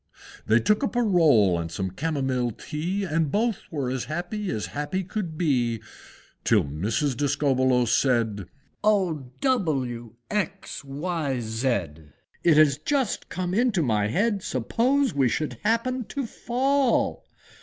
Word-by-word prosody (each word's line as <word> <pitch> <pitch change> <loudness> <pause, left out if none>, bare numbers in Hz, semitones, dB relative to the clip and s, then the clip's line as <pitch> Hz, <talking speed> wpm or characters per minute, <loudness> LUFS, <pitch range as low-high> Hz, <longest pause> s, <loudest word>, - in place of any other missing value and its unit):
They 110 +2 +5
took 210 - +2
up 270 - -1
a 245 - +3
roll 145 - +4
and 85 -1 -4
some 95 +2 -3
Camomile 130 - -1
tea, 175 - -3
And 160 -5 0
both 225 0 +1
were 140 -6 -2
as 130 -2 -2
happy 180 +6 -4
as 105 - -2
happy 165 +7 -2
could 180 -4 -4
be, 125 -9 +1 0.6
Till - - +4
Mrs. 105 - -1
Discobbolos 130 -3 +2
said, 115 -7 +1 0.4
"Oh! 180 -11 +1
W! 135 - -1 0.2
X! 200 -4 -3
Y! 145 -1 -2
Z! 115 +3 -2 0.8
It 165 -3 +5
has 150 -3 +5
just 270 - -1
come 180 -1 -3
into 215 -5 +2
my 105 -5 +1
head, 200 - +1
Suppose 245 - +1
we 135 -3 +2
should 155 +5 -2
happen 230 +3 0
to 280 +3 -4
fall!!!!! 260 +3 +1
155 Hz, 135 wpm, -25 LUFS, 125-205 Hz, 0.8 s, They